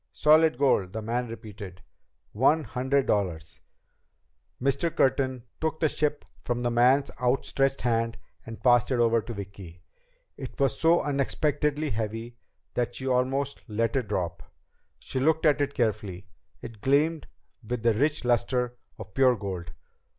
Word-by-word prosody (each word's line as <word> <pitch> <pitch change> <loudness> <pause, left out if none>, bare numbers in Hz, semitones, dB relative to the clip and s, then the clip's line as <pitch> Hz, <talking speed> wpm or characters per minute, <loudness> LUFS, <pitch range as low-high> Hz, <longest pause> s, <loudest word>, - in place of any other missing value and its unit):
"Solid 155 -2 +4
gold," 115 -9 +2
the 110 - -3
man 120 +3 -2
repeated. 105 -5 -9 0.5
"One 145 +8 +3
hundred 130 +1 0
dollar." 95 -6 +1 1.2
Mr. 140 +5 0
Curtin 130 -2 +1 0.2
took 160 0 -2
the 155 - +2
ship 150 0 -1 0.2
from 120 0 -2
the 120 0 0
man's 125 +4 +3
outstretched 135 +2 +1
hand 115 -1 0 0.3
and 115 +1 -10
passed 120 -1 +4
it 130 - +1
over 115 -1 +3
to 120 - -7
Vicki. 95 -4 -9 0.5
It - - -8
was 135 -1 +1
so 165 +1 +4
unexpectedly 150 +1 0
heavy 115 +2 -4 0.4
that 120 -1 -1
she 130 - -5
almost 130 +2 0
let 115 +2 -1
it 130 -5 0
drop. 85 -4 -2 0.6
She 130 - -4
looked 160 +4 +2
at 145 -1 +4
it 140 0 -1
carefully. 105 -5 -2 0.4
It 115 -3 -9
gleamed 150 +5 +2 0.4
with 120 +1 -4
the 115 -1 +4
rich 145 +4 0
luster 125 0 0 0.2
of - - -10
pure 130 -2 +4
gold. 95 -6 -6
125 Hz, 145 wpm, -27 LUFS, 110-140 Hz, 1.2 s, Solid